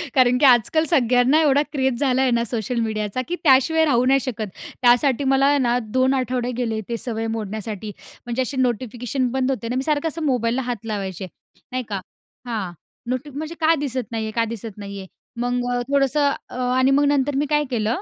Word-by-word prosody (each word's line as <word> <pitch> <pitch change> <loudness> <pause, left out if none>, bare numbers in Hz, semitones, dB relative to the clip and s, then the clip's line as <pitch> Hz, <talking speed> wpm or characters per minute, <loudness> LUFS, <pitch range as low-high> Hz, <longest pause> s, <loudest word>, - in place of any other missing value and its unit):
कारण, 250 -1 +5
की 285 - +3
आजकाल 260 +5 +4
सगळ्यांना 255 -1 +4
एवढा 285 -2 +4
क्रेज 265 -4 0
झाला 265 -2 +2
आहे 260 -2 +2
ना, 235 0 +2
सोशल 235 +1 -2
मीडियाचा, 215 +1 -2
की 355 - -2
त्याशिवाय 320 +3 +4
राहू 250 -4 +2
नाही 270 +1 +4
शकत. 230 -5 -4 0.3
त्यासाठी 245 +2 +4
मला 270 0 +3
आहे 285 +1 +4
ना 245 -3 +2 0.2
2 260 +1 +3
आठवडे 250 -1 -1
गेले 225 -3 -1
ते 235 - -2
सवय 225 -2 -4
मोडण्यासाठी. 215 0 -5 0.3
म्हणजे 240 +1 -1
असे 260 +2 -3
नोटिफिकेशन 250 +1 -1
बंद 265 0 0
होते 240 -3 -3
ना. 245 - -2
मी 260 - 0
सारखं 300 +1 0
असं 325 +1 -4
मोबाईलला 250 -2 +1
हात 235 -3 -4
लावायचे, 195 -3 -4 0.4
नाही 255 0 -2
का, 200 -2 -3 0.5
हां. 215 -7 -3 0.4
नोटी 255 +3 -3
म्हणजे 310 +4 -6
का 315 +1 +5
दिसत 255 -4 -4
नाहीये, 220 -1 -3
का 230 +1 +1
दिसत 220 -2 -8
नाहीये? 200 -2 -7 0.3
मग 245 0 0 0.3
थोडंसं 280 +1 +2 0.4
आणि 260 +1 +3
मग 290 - +3
नंतर 285 0 +1
मी - - 0
काय 295 0 +2
केलं, 225 - 0
250 Hz, 190 wpm, -22 LUFS, 230-275 Hz, 0.5 s, कारण